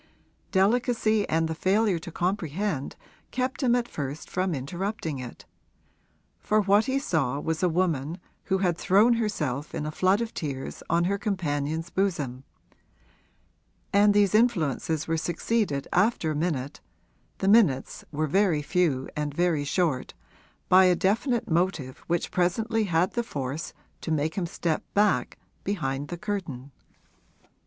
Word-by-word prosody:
Delicacy 220 +1 +2
and 160 +1 +2
the 160 - -2
failure 190 +2 +2
to 170 - -9
comprehend 175 -3 -2 0.3
kept 255 +4 -2
him 245 -3 +3
at 240 -1 0
first 145 - -6
from 185 -2 0
interrupting 165 - -4
it 125 -2 -9 0.9
for 215 - +2
what 205 +2 +4
he 265 +1 0
saw 145 - 0
was 160 +1 -2
a 180 - +3
woman 165 -3 0 0.3
who 190 - +1
had 180 -3 0
thrown 205 +5 +5
herself 155 - -2
in 150 - -3
a 155 - -3
flood 185 +5 +2
of 230 -1 -3
tears 135 -5 -5
on 170 +1 +3
her 200 +3 0
companion's 165 -5 -2
bosom 150 -10 -1 1.5
and 205 +1 +5
these 205 -1 +4
influences 160 - +1
were 165 0 0
succeeded 170 -3 -1
after 190 -5 +2
a - - -2
minute 145 -4 -2 0.6
(the 190 - -2
minutes 195 - +3
were 155 +1 0
very 165 -1 +2
few 145 -6 +1
and 150 -1 -3
very 170 -4 +1
short) 145 -2 -1 0.5
by 185 +1 +7
a 180 -1 +5
definite 215 +7 +1
motive 165 -6 0
which 170 0 -1
presently 215 +5 +1
had 175 0 +1
the 240 - -1
force 140 - -4 0.3
to - - -5
make 155 0 0
him 180 -3 -2
step 165 -1 -2
back 200 - +2 0.3
behind 145 -8 -2
the 175 - -5
curtain. 170 - -5
175 Hz, 145 wpm, -27 LUFS, 150-205 Hz, 1.5 s, by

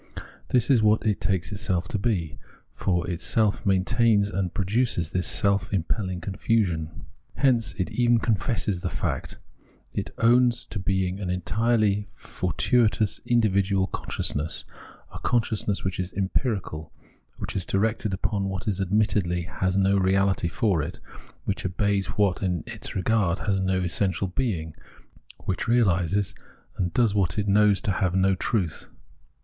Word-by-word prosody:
This 125 +2 +2
is 125 -4 +5
what 110 +1 +3
it 105 -2 +1
takes 95 -2 -1
itself 95 -4 -2
to 105 - -1
be; 95 -8 -1 0.3
for 90 -3 -1
itself 100 +5 0
maintains 100 +2 +3
and 95 -3 -1
produces 100 -4 0
this 90 -1 -1
self 100 -1 +1
impelhng 95 -1 -2
confusion. 90 -5 -1 0.3
Hence 120 -5 +2
it 90 - -2
even 120 -1 +3
confesses 110 -3 -1
the - - -2
fact; - - -3 0.6
it - - -3
owns 120 +1 +3
to 110 - -6
being 95 0 -1
an 95 -3 -3
entirely 105 +2 +1
fortuitous 110 -1 0
individual 100 -5 +2
con - - -7
sciousness 75 +2 -1 0.2
— - - -22
a - - -7
consciousness 110 -4 0
which 95 -2 -3
is 90 0 -3
empirical, 95 - -2 0.5
which - - -5
is 95 - +1
directed 110 +3 0
upon 100 +1 -1
what 95 +2 -5
admittedly 95 -2 +1
has 95 +3 -1
no 100 0 +3
reahty 95 -1 +2
for 90 -2 +1
it, 75 - -6 0.5
which 100 - -2
obeys 100 +1 0
what, 100 -3 +2
in 90 -4 -1
its - - -6
regard, 95 -1 +1
has 100 -2 +1
no 95 -1 0
essential 95 +1 +1
being, 90 -8 -2 0.7
which 95 - -2
realises 100 -5 +2 0.5
and 90 -2 0
does 115 -4 +2
what 95 -3 0
it 105 -1 0
knows 100 -1 +4
to 105 - 0
have 90 -1 0
no 95 0 +3
truth. 95 -3 -2
100 Hz, 145 wpm, -25 LUFS, 90-110 Hz, 0.7 s, is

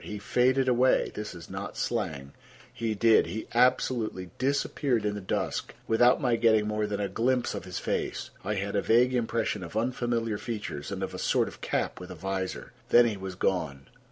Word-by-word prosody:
He 105 - -6
faded 130 +5 +2
away—this 125 -5 +1
is 85 -1 -10
not - - -6
slang; 70 0 -2 0.4
he 115 -2 -2
did—he 110 -2 +3
absolutely 115 -6 +1
disappeared 135 -2 0
in 105 - 0
the 105 - -5
dusk 95 - -2
without 120 +3 +5
my 120 -3 +2
getting 110 -2 +4
more 105 0 -1
than 105 -1 -3
a 100 - 0
glimpse 120 +6 0
of 100 - -6
his 90 -1 -5
face. - - -2
I 105 +2 -1
had 100 +1 -2
a 100 - +2
vague 125 +3 +4
impression 115 -3 0
of 85 +5 -6
unfamiliar 115 -2 -1
features 105 -11 -5
and - - -3
of - - -4
a - - -6
sort - - +2
of - - -10
cap - - -2
with 90 0 -9
a 90 - -7
visor. 95 +2 -4 0.2
Then 120 0 +7
he 110 -3 0
was 95 -1 -6
gone. 70 -8 -1
110 Hz, 185 wpm, -28 LUFS, 95-120 Hz, 0.4 s, Then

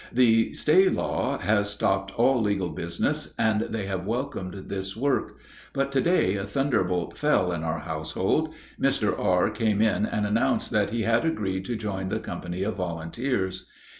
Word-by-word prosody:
The 115 -2 +3
stay 185 +5 +5
law - - -1
has 105 -1 +1
stopped 95 -1 0
all 125 +1 +4
legal 100 -4 0
business, 85 0 -2
and 110 -1 +2
they 110 -2 -3
have 95 -2 -3
welcomed 115 -6 -3
this 95 +1 -4
work. 140 +3 0 0.4
But 135 0 0
to 135 -1 +2
day 115 - +2
a 95 - -3
thunderbolt 100 -7 0
fell 150 -12 +2
in 85 -2 -3
our 80 -1 -2
household. 80 -1 -1 0.3
Mr. - - +2
R. 90 +3 +2
came 105 -1 0
in 110 -1 +2
and 105 - -1
announced 115 +6 +1
that 105 -2 +2
he 115 +1 -1
had 115 +4 +2
agreed 95 -12 -1
to 120 - -2
join 95 -4 -3
the - - -1
company 90 +1 -5
of 110 +1 -2
volunteers. 95 +3 -2
105 Hz, 165 wpm, -26 LUFS, 95-115 Hz, 0.4 s, stay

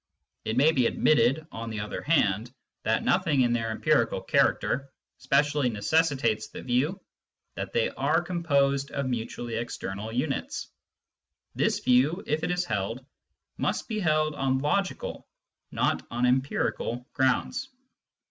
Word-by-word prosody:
It 110 - -2
may 145 +5 +6
be 130 -7 +3
admitted, 135 +2 +3
on 115 +1 -6
the 110 -1 -4
other 105 +1 -4
hand, 115 -7 +1 0.3
that 110 +1 +1
nothing 165 -7 +2
in 120 -1 +3
their 115 -1 -1
empirical 110 - +1
character 135 +2 +1 0.3
specially 140 +1 +2
necessitates 115 0 +1
the - - -9
view 130 +9 0 0.5
that - - -5
they 485 +1 +1
are - - +1
composed 140 -5 +1
of 140 - -3
mutually 120 -1 -3
external 110 -2 -5
units. 130 +4 -2 0.8
This - - +1
view, 135 +8 +3
if 155 +2 -1
it 165 - 0
is 180 0 0
held, 110 +4 -3 0.5
must - - -1
be 220 -2 -2
held 155 -4 +2
on 135 -2 0
logical, 165 +8 -2 0.4
not - - 0
on 120 +1 0
empirical, 125 -1 0
grounds. 190 - 0
130 Hz, 135 wpm, -27 LUFS, 115-155 Hz, 0.8 s, may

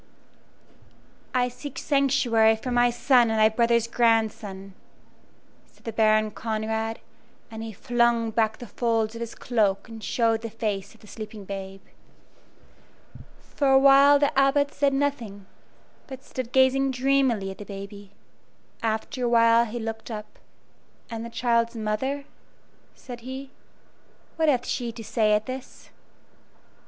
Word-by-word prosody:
"I 250 -1 +1
seek 265 +3 -9
sanctuary 255 -6 +3
for 250 +3 -6
my 245 0 +4
son 240 0 +3
and 220 - 0
thy 215 0 +6
brother's 235 0 +2
grandson," 220 -4 0 0.9
said - - -27
the 225 - -4
Baron 215 -1 +3
Conrad, 220 +1 -3 0.5
and 220 0 -7
he 225 0 -6
flung 235 +1 +1
back 220 -1 0
the 245 - -9
folds 225 -1 -1
of 230 - -8
his 230 -1 -6
cloak 205 -4 0
and 225 -2 -10
showed 225 -2 +1
the 230 - -5
face 215 -2 -4
of - - -22
the - - -16
sleeping 215 -1 -9
babe. 195 0 -7 1.7
For 285 - 0
a 265 - +7
while 275 +1 +7
the 285 0 +1
Abbot 280 +1 +2
said 280 -1 +1
nothing, 235 -9 -2 0.6
but 265 -1 -9
stood 255 -2 -6
gazing 265 +1 +3
dreamily 255 -6 +1
at 190 - -12
the - - -6
baby. 200 0 -9 0.7
After 225 +3 -2
a - - +1
while 230 0 +5
he 235 +1 -6
looked 225 0 -6
up. 210 -1 -8 0.7
"And 225 0 -5
the 235 - -7
child's 235 0 0
mother," 235 +6 -2 0.7
said 245 -2 -10
he 260 +3 -8 0.8
"what 320 -1 +2
hath 255 -3 +1
she 240 -2 -3
to 225 0 -9
say 215 -1 +1
at 210 +1 +1
this?" 260 0 -9
230 Hz, 145 wpm, -25 LUFS, 220-255 Hz, 1.7 s, a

